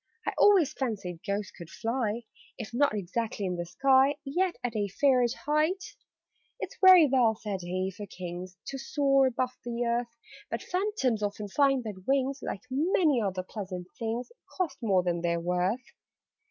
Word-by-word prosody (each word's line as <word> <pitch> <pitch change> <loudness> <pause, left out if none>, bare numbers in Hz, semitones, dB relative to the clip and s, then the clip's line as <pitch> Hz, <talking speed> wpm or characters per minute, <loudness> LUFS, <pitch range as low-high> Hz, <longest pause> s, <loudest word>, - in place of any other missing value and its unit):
I - - 0
always 365 -8 +5
fancied 200 - -3
Ghosts 200 0 -2
could 170 -2 -11
fly 230 +1 -2 0.3
If 235 -1 -7
not 275 -2 +2
exactly 210 +2 -3
in 180 -1 -1
the 175 0 -4
sky, 270 +7 +4
Yet 355 +6 0
at 240 -2 -2
a 205 -1 0
fairish 250 +3 +2
height." 310 +6 0 0.7
"It's - - -5
very 370 -3 +9
well," 250 -5 +3
said 205 -3 -4
he, 185 +2 -2
"for 205 -1 -7
Kings 180 0 -7
To 270 - -5
soar 275 -1 +3
above 255 0 -1
the 240 0 -2
earth: 235 0 -1 0.3
But - - -4
Phantoms 360 - 0
often 205 0 -3
find 270 +2 +3
that 195 -4 -7
wings 275 0 +1
Like - - -5
many 300 -2 +2
other 190 -3 -2
pleasant 185 -3 -7
things 230 - -3 0.3
Cost 345 -7 -1
more 195 -5 +2
than 175 -1 -1
they 170 0 +1
are - - -1
worth. 180 +8 0
235 Hz, 165 wpm, -29 LUFS, 190-275 Hz, 0.7 s, very